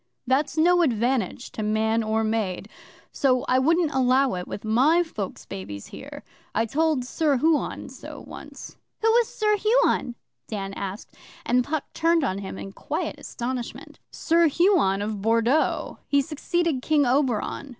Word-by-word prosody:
That's 275 +4 0
no 350 +2 +4
advantage 245 - 0
to - - -5
man 220 +1 +1
or 220 0 0
maid. 215 -4 -2 0.4
So 255 -2 +1
I 255 - +3
wouldn't 325 +3 +2
allow 260 +1 +3
it 180 -1 -4
with 205 - -7
my 275 +11 +4
folks' 215 - -6
babies 100 +1 -7
here. - - -9 0.3
I 225 +2 +2
told 300 +1 0
Sir 290 +1 +1
Huon 315 +3 0
so - - -10
once.' - - -10 0.3
'Who - - +4
was 470 0 +4
Sir 425 -2 +1
Huon?' 430 - +2 0.3
Dan 195 -3 -4
asked, 195 +2 -6 0.3
and 250 0 +2
Puck 305 +2 -2
turned 330 -1 +2
on 195 -7 -1
him 190 -1 -6
in 195 - -7
quiet - - -4
astonishment. 245 0 -6
'Sir 335 +1 +3
Huon 305 - +3
of 210 -1 -4
Bordeaux 230 +7 +1
he 285 - +3
succeeded 310 0 -1
King 295 0 +2
Oberon. 260 +1 0
255 Hz, 150 wpm, -25 LUFS, 220-315 Hz, 0.4 s, no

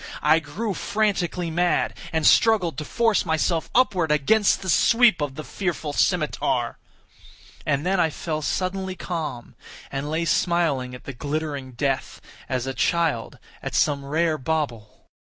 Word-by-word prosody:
I 155 +2 +5
grew 195 +8 -4
frantically 185 -5 -1
mad, 175 +2 +1 0.2
and 160 -2 0
struggled 200 -8 +4
to 150 - -5
force 230 +2 +2
myself 160 0 0
upward 190 -11 +3
against 195 +9 +3
the - - -6
sweep 225 +2 +4
of 145 -2 -2
the 155 - -6
fearful 170 -6 -3
scimitar. 145 -8 0 0.9
And 145 +1 0
then 190 +1 +1
I 165 - +3
fell 155 0 -4
suddenly 185 +3 -2
calm, 155 -9 -5 0.4
and 140 +2 -3
lay 160 +2 -1
smiling 160 -8 +1
at 125 - -12
the 140 - -7
glittering 145 -1 -4
death, 135 +2 -2 0.3
as 130 -1 -1
a 135 - -3
child 160 -7 0 0.2
at - - -5
some 140 -2 +2
rare 155 +3 0
bauble. 130 -7 -3
160 Hz, 145 wpm, -24 LUFS, 140-180 Hz, 0.9 s, I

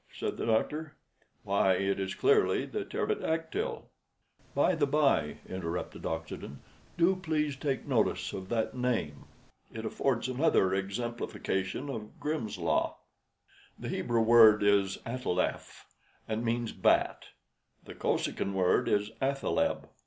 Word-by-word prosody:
said - - -3
the - - -4
doctor. 150 +7 0 0.5
"Why, 95 -1 +3
it 100 +1 0
is 95 -1 -3
clearly 425 0 +3
the 420 - -4
pterodactyl." 420 - -2 0.7
"By - - +3
the 155 -4 +1
bye," 140 - +2
interrupted 90 -2 -4
Oxenden, 80 -4 -5 0.4
"do 175 +3 +4
please 155 -5 -1
take 135 -1 -2
notice - - +1
of 95 0 -6
that 115 +2 -1
name. 120 - -2 0.5
It 110 0 -6
affords 125 +2 0
another 130 - +2
exemplification 100 +2 -3
of 110 -6 -7
'Grimm's 150 -8 -3
Law.' - - 0 0.8
The - - -6
Hebrew 120 -1 0
word 110 -2 +7
is 100 -1 +3
'ataleph,' 115 -7 -2 0.4
and 110 +1 -2
means 115 0 -1
bat. - - +2 0.6
The - - -10
Kosekin 100 - -1
word 90 -1 +2
is 105 +1 +1
'athaleb.' 140 - 0
115 Hz, 125 wpm, -30 LUFS, 100-150 Hz, 0.8 s, word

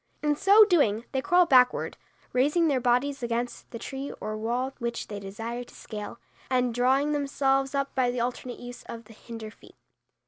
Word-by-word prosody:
In 295 -1 +2
so 400 +6 +7
doing 245 - +2
they 265 - 0
crawl 360 +2 +4
backward, 255 -6 +4 0.4
raising 295 +7 +3
their 275 -4 +2
bodies 255 +3 +1
against 235 +1 -3
the 230 - -7
tree 270 +4 -6
or 215 0 -4
wall 240 +5 -2
which 235 0 -4
they 205 -1 -5
desire 225 +5 -5
to - - -17
scale, 210 0 -7 0.3
and 250 -2 +1
drawing 265 +5 +2
themselves 275 -1 +1
up 275 0 -1
by 255 -2 +2
the 245 0 -2
alternate 245 +1 -3
use 245 0 -9
of 230 -1 -8
the 225 - -14
hinder 220 -1 -9
feet. - - -19
250 Hz, 180 wpm, -27 LUFS, 235-275 Hz, 0.4 s, so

